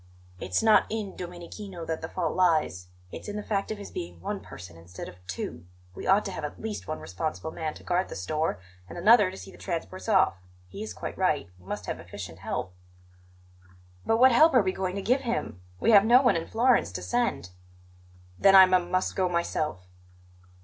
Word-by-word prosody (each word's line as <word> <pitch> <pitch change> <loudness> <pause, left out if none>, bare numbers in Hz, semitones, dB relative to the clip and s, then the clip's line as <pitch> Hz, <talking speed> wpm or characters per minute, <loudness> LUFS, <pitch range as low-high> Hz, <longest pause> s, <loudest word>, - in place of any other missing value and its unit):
"It's 90 - -1
not 220 -1 +5
in 215 -3 -4
Domenichino 175 +1 -8
that 160 -1 -3
the 160 - -5
fault 170 -4 -2
lies; 155 - +2 0.2
it's - - -8
in 205 - -5
the 210 - -4
fact 200 -2 -2
of 215 - -3
his 200 - -9
being 85 0 -6
one - - -4
person 90 -1 -11
instead 85 +2 -9
of 90 +1 -13
two. 85 -3 -6 0.3
We - - -7
ought 200 +2 +4
to 195 - -3
have 160 - -6
at 150 - -6
least 220 -1 -5
one 155 - -3
responsible 155 - -4
man 160 -1 -4
to - - -13
guard 180 +1 0
the - - -7
store 150 - -2 0.3
and 85 - -8
another 215 -3 +6
to 190 - -9
see 195 - -10
the - - -16
transports 185 +3 -5
off. 190 - +3 0.3
He 200 - -9
is 215 - -6
quite - - -6
right; 155 - +1
he 90 - -22
must 95 - -5
have - - -4
efficient - - -9
help." 90 - -4 1.3
"But 225 - +2
what 260 +2 +7
help 310 +5 +6
are 245 - +6
we 190 - +1
going 185 -1 -3
to 200 - -4
give 255 +6 +2
him? 235 - -3 0.2
We - - +3
have 200 -2 +8
no 245 +4 +6
one 240 -7 +4
in 165 0 -2
Florence 235 - +2
to 90 -1 -5
send." 90 0 -1 0.9
"Then 195 0 +6
I 190 - +11
m 185 -1 +2
must 185 +1 0
go 185 -1 +1
myself." 155 - -2
180 Hz, 210 wpm, -27 LUFS, 135-205 Hz, 1.3 s, I